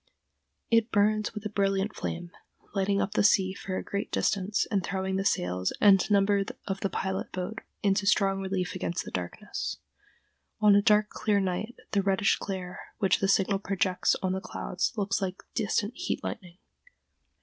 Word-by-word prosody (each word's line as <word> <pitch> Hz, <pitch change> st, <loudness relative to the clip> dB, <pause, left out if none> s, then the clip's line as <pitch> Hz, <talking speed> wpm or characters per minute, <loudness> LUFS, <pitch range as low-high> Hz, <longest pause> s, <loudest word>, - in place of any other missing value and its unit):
It 230 Hz, 0 st, +4 dB
burns 215 Hz, +1 st, +2 dB
with 210 Hz, 0 st, -6 dB
a -, -, -1 dB
brilliant 195 Hz, 0 st, 0 dB
flame, 175 Hz, 0 st, -4 dB, 0.4 s
lighting 200 Hz, 0 st, +1 dB
up 200 Hz, -, 0 dB
the 210 Hz, -, +2 dB
sea 190 Hz, -2 st, +4 dB
for 190 Hz, -1 st, -5 dB
a -, -, -3 dB
great 200 Hz, 0 st, -4 dB
distance 200 Hz, 0 st, +1 dB
and 195 Hz, -3 st, +1 dB
throwing 190 Hz, +1 st, -2 dB
the 195 Hz, -, 0 dB
sails 90 Hz, -, 0 dB
and 195 Hz, -2 st, +5 dB
number 200 Hz, 0 st, +3 dB, 0.2 s
of 195 Hz, -1 st, -3 dB
the 195 Hz, -, -1 dB
pilot 190 Hz, 0 st, -3 dB
boat 185 Hz, +5 st, -4 dB, 0.2 s
into 200 Hz, 0 st, +2 dB
strong 195 Hz, -1 st, +3 dB
relief 185 Hz, -2 st, -2 dB
against 175 Hz, -2 st, -3 dB
the -, -, -8 dB
darkness. 90 Hz, -1 st, -4 dB, 0.8 s
On 210 Hz, -1 st, +6 dB
a 205 Hz, -, +6 dB
dark 210 Hz, 0 st, +4 dB
clear 210 Hz, -2 st, +1 dB
night, 195 Hz, +5 st, -2 dB, 0.2 s
the 200 Hz, -, +2 dB
reddish 195 Hz, +1 st, +2 dB
glare 185 Hz, -2 st, -5 dB, 0.2 s
which 195 Hz, -, +2 dB
the 195 Hz, -, +1 dB
signal 195 Hz, 0 st, +2 dB
projects 190 Hz, -2 st, +1 dB
on 185 Hz, -, +1 dB
the 190 Hz, -, -2 dB
clouds 185 Hz, 0 st, -2 dB
looks 200 Hz, 0 st, 0 dB
like 190 Hz, -1 st, -3 dB
distant 215 Hz, 0 st, 0 dB
heat 355 Hz, +2 st, -3 dB
lightning. 180 Hz, -4 st, -6 dB
195 Hz, 170 wpm, -28 LUFS, 190-205 Hz, 0.8 s, On